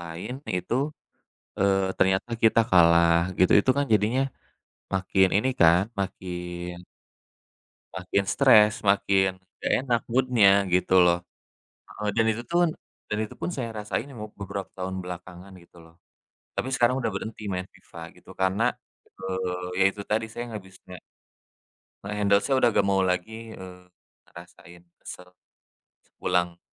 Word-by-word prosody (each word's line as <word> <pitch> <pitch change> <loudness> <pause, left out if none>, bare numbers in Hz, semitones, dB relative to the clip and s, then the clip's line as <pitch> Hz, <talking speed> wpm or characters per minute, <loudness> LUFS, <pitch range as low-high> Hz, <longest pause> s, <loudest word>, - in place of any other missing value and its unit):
lain 85 +6 -7 0.2
itu, 90 +6 -3 0.8
eee, 95 0 +3 0.2
ternyata 95 +4 +1
kita 115 0 +5
kalah 85 -1 +5 0.2
gitu. 90 - +4
Itu 130 - +1
kan 145 - +2
jadinya 110 +6 +2 0.7
makin 95 0 +2
ini 130 +6 +1
kan 85 +2 +6 0.2
makin 90 -2 -5 1.1
makin 95 +1 -1
stres, 110 -6 +6 0.2
makin 95 -1 +3 0.3
nggak - - 0
enak 120 -2 +1
mood-nya 125 -4 +4 0.2
gitu 90 +1 +2
loh, 85 0 +4 0.7
heeh. 105 0 -4
Dan 115 - +3
itu 115 +2 -5
tun 175 0 +2 0.4
dan 105 - -2
itu - - -14
pun 180 - -4
saya 125 -7 -4
rasain 105 +5 -3
emub 110 -6 -9
beberapa 100 0 -5
tahun 95 0 -4
belakangan 90 +1 -9
gitu 85 0 -21
loh. 80 0 -19 0.6
Tapi - - -1
sekarang 125 +1 +2
udah 130 - -1
berhenti 110 +2 -6
main 90 -1 -2
FIFA - - -12
gitu - - -20
karena, 95 +3 0 0.6
eee, 90 -1 -3
ya - - +5
itu 105 - -8
tadi 110 +2 -1
saya 115 +2 -6
nggak 105 -3 -6
bis 95 - -18
nge 90 -1 -11 1.0
nge-handle 100 0 +2
saya 135 - 0
udah 120 -2 +4
nggak 100 - +2
mau 95 0 +2
lagi, 110 +5 -3
eee, 90 -2 -11 0.4
ngerasain 85 0 -15 0.2
kesel 90 0 -11 0.7
sepulang 90 -1 -2
95 Hz, 140 wpm, -25 LUFS, 90-110 Hz, 1.1 s, kan